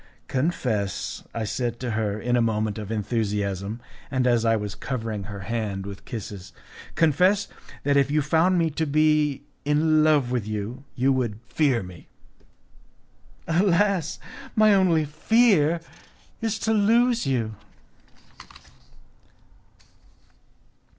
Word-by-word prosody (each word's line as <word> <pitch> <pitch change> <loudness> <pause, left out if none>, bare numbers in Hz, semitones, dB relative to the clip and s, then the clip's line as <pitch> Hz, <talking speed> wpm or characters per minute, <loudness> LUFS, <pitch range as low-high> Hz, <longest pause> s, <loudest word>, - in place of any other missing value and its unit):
"Confess," 125 - -2
I 115 - -3
said 120 +2 -2
to 125 -2 -2
her, 110 -2 -1
in 120 +2 0
a 120 - +3
moment 110 -2 0
of 105 0 -6
enthusiasm, 105 -1 -2 0.3
and 130 -2 0
as 120 -2 +2
I 115 0 +4
was 105 -2 -3
covering 110 -6 -4
her 100 -1 -7
hand 100 -2 -3
with 100 -1 -9
kisses, 100 -4 -7 0.4
"confess 180 +6 +3 0.4
that 145 0 +2
if 140 0 +3
you 150 0 +1
found 165 +5 +3
me 165 -2 +1
to 160 +2 -2
be 150 -1 +2 0.2
in 155 +1 +3
love 150 -5 +3
with 120 -5 -1
you 110 +5 -4
you 135 +2 +2
would 120 -5 -2
fear 130 -6 +1
me." 90 -2 -12 1.4
"Alas! 180 0 +2 0.4
my 215 -2 +5
only 175 -5 +3
fear 170 0 +3 0.6
is 225 -1 -1
to 220 0 0
lose 230 - +3
you." 115 -5 0
130 Hz, 125 wpm, -25 LUFS, 110-160 Hz, 1.4 s, my